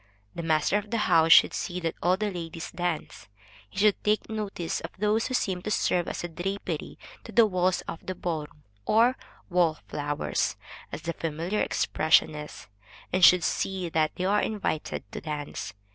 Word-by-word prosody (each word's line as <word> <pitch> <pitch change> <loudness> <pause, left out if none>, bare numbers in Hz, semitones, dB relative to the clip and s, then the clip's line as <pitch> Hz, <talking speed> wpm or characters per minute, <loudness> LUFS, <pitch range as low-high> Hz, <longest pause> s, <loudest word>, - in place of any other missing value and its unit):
The - - -5
master 160 +5 +2
of 210 0 -11
the 230 - 0
house 165 0 +4
should - - +8
see 180 0 -3
that 165 -1 -1
all 180 +2 +3
the 210 0 -1
ladies 165 -2 -6
dance; 170 - -4 0.4
he - - -16
should 205 +1 +3
take 210 0 +1
notice 205 -6 -3
of - - -6
those 210 +3 +1
who 255 - -2
seem 185 -6 -1
to 205 - -4
serve 180 -4 +1
as - - -4
drapery 180 +4 -4 0.3
to - - -10
the 230 - +6
walls 185 -2 +1
of 165 - -8
the 185 - -4
ball 160 -4 -3
room, 150 - -24 0.2
or 235 +4 +4 0.4
wall 170 -3 +3
flowers, 145 0 -1 0.3
as 155 - -6
the 170 - -2
familiar 165 +6 -2
expression 155 0 +2
is, 150 0 -8 0.5
and 185 0 +1
should 180 0 +8
see 185 -3 -1
that 155 -1 +1
they 185 - -2
are 205 +2 +3
invited 200 -7 -2
to - - -6
dance. 150 -7 -5
175 Hz, 180 wpm, -27 LUFS, 160-200 Hz, 0.5 s, should